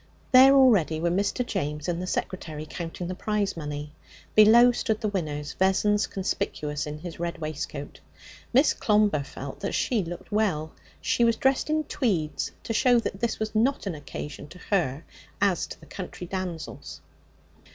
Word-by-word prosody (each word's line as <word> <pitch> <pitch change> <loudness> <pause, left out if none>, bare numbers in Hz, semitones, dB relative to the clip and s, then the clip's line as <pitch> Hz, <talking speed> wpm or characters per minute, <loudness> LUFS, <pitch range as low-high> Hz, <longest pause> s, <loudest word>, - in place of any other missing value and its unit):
There 265 +2 +8
already 210 - +5
were 170 +1 +1
Mr. 200 +7 0
James 150 - -3
and 175 0 -1
the 185 - -4
secretary, 160 -5 -4
counting 170 +1 -5
the 185 - -3
prize 205 +1 -1
money. 150 -2 -5 0.4
Below 230 +3 +7
stood 225 -3 -1
the 215 - -1
winners, 150 -7 -3
Vessons 205 +2 +2
conspicuous 150 -7 -3
in 150 0 -5
his 165 +1 -8
red 170 +1 -3
waistcoat. 155 -2 -5 0.5
Miss 270 +5 +5
Clomber 210 -8 +2
felt 135 0 -8
that - - -3
she 230 -6 +1
looked 175 +4 -8
well. 185 -8 0 0.3
She 240 - +1
was 230 -1 +4
dressed 265 +4 +1
in 310 0 +1
tweeds 185 - -1
to 225 - -3
show 245 +2 +4
that 210 -4 -2
this 235 +1 -1
was 215 0 -3
not 235 +5 +1
an 195 - -2
occasion 145 0 -7
to 175 - -13
her 160 -7 +1 0.4
as 195 -4 +2
to - - -9
the - - -15
country 180 -2 -7
damsels. 180 -3 -6
185 Hz, 165 wpm, -26 LUFS, 155-220 Hz, 0.5 s, There